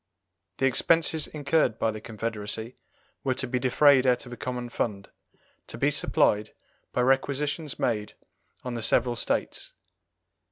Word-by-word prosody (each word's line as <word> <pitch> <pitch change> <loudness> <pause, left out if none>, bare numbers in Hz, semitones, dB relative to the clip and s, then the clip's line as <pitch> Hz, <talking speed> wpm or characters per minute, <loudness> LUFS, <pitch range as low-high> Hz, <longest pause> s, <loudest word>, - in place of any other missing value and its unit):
The 135 - +1
expenses 160 +4 +2
incurred 150 -5 +1
by 115 - +1
the 110 0 -8
confederacy 110 +1 -5 0.5
were 130 -2 0
to - - -2
be 125 +1 -1
defrayed 130 +1 +5
out 125 -1 +2
of 120 - -9
a - - -5
common 125 -1 -4
fund, 100 -4 -3 0.6
to - - -7
be - - +2
supplied 105 +1 +1 0.4
by 125 - 0
requisitions 140 +3 0
made 105 -3 -1 0.5
on 125 - -4
the 115 - -4
several 120 +2 +2
States. 110 - -2
125 Hz, 145 wpm, -27 LUFS, 110-135 Hz, 0.6 s, defrayed